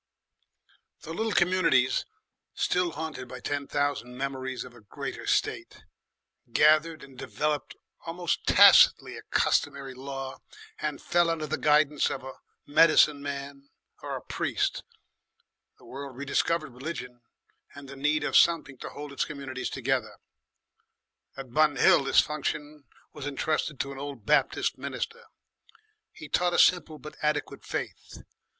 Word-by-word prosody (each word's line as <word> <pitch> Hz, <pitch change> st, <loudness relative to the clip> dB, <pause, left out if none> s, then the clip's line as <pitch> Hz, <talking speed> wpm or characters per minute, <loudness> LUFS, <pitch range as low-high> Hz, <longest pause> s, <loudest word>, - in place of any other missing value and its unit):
The 160 Hz, -, -7 dB
little 220 Hz, +5 st, -1 dB
communities, 175 Hz, -9 st, +2 dB, 0.5 s
still 180 Hz, -2 st, 0 dB
haunted 155 Hz, -4 st, -6 dB
by 125 Hz, 0 st, -9 dB
ten 140 Hz, +2 st, -3 dB
thousand 145 Hz, -4 st, -2 dB
memories 130 Hz, -1 st, -4 dB
of 125 Hz, -, -12 dB
a 120 Hz, -, -16 dB
greater 105 Hz, -, -7 dB
state, -, -, -1 dB, 0.7 s
gathered 155 Hz, +4 st, +3 dB
and 135 Hz, -1 st, -14 dB
developed 150 Hz, +3 st, -3 dB, 0.3 s
almost 170 Hz, +1 st, -2 dB
tacitly -, -, +7 dB
a -, -, -8 dB
customary 135 Hz, -1 st, 0 dB
law 135 Hz, 0 st, -7 dB, 0.4 s
and 150 Hz, -2 st, -3 dB
fell 175 Hz, -1 st, +2 dB
under 165 Hz, -2 st, -1 dB
the 150 Hz, -, -2 dB
guidance 150 Hz, -1 st, +3 dB
of 130 Hz, -, -5 dB
a 130 Hz, 0 st, -8 dB, 0.3 s
medicine 150 Hz, -1 st, +5 dB
man 140 Hz, 0 st, -7 dB, 0.3 s
or -, -, -5 dB
a -, -, -7 dB
priest. -, -, -2 dB, 0.9 s
The -, -, -19 dB
world 135 Hz, -1 st, -8 dB
rediscovered 145 Hz, +1 st, -1 dB
religion 125 Hz, -3 st, -7 dB, 0.5 s
and 140 Hz, -1 st, -10 dB
the 140 Hz, -, -9 dB
need 150 Hz, +2 st, 0 dB
of -, -, -2 dB
something 160 Hz, -6 st, +3 dB
to -, -, -7 dB
hold 145 Hz, 0 st, -8 dB
its -, -, 0 dB
communities 135 Hz, -3 st, -5 dB
together. 130 Hz, -4 st, -2 dB, 1.2 s
At 130 Hz, -3 st, -9 dB
Bun 155 Hz, -1 st, +4 dB
Hill 135 Hz, -, +5 dB
this -, -, +5 dB
function 150 Hz, -1 st, -4 dB, 0.3 s
was 145 Hz, -1 st, -6 dB
entrusted 150 Hz, +1 st, -2 dB
to 140 Hz, -, -2 dB
an 135 Hz, -, -8 dB
old 140 Hz, -6 st, -7 dB
Baptist -, -, +1 dB
minister. 475 Hz, +1 st, -5 dB, 0.9 s
He -, -, -11 dB
taught 175 Hz, -1 st, +1 dB
a -, -, +2 dB
simple 160 Hz, -3 st, +3 dB
but 150 Hz, 0 st, -11 dB
adequate 150 Hz, -1 st, -2 dB
faith. -, -, -6 dB
145 Hz, 140 wpm, -27 LUFS, 135-155 Hz, 1.2 s, tacitly